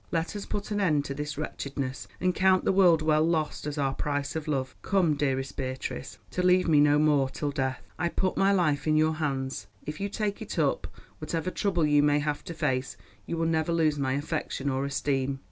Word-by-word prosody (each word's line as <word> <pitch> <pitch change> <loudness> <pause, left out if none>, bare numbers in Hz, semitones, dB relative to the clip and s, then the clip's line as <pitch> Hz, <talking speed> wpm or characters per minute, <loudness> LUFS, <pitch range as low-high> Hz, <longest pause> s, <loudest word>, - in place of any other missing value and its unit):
Let 165 +3 -1
us 205 - -5
put 205 0 -4
an 205 0 0
end 150 -7 +2
to 140 - -3
this 150 +1 -5
wretchedness, 140 -3 -4
and 180 0 +1
count 190 0 +3
the - - +4
world 175 -5 +5
well 155 -1 +3
lost 160 -2 -1
as 150 0 -4
our 135 -2 +1
price 145 +1 -2
of 160 -1 -4
love. 135 -3 -2
Come, 185 -6 +2
dearest 135 -2 -1
Beatrice—to 130 - -5
leave 180 0 +4
me 155 -3 +5
no 145 0 +5
more 145 -3 +3
till 145 +2 -3
death. 130 -3 -2 0.2
I 170 - +1
put 185 +2 -1
my 195 +1 +3
life 155 -7 +1
in 155 0 +3
your 155 +1 +3
hands; 135 -8 -3 0.2
if 150 +1 -5
you 200 +1 -2
take 205 -1 -2
it - - -6
up, - - +1 0.3
whatever 170 +2 -2
trouble 180 -6 +1
you 150 -1 +4
may 145 0 +3
have 145 0 -2
to 170 - -6
face, 130 -4 -1 0.3
you 170 - -3
will 165 - 0
never 160 0 +1
lose 155 -3 +2
my 130 -1 0
affection 140 -1 -2
or 135 +1 -1
esteem. 140 -1 -1
150 Hz, 215 wpm, -28 LUFS, 140-170 Hz, 0.3 s, world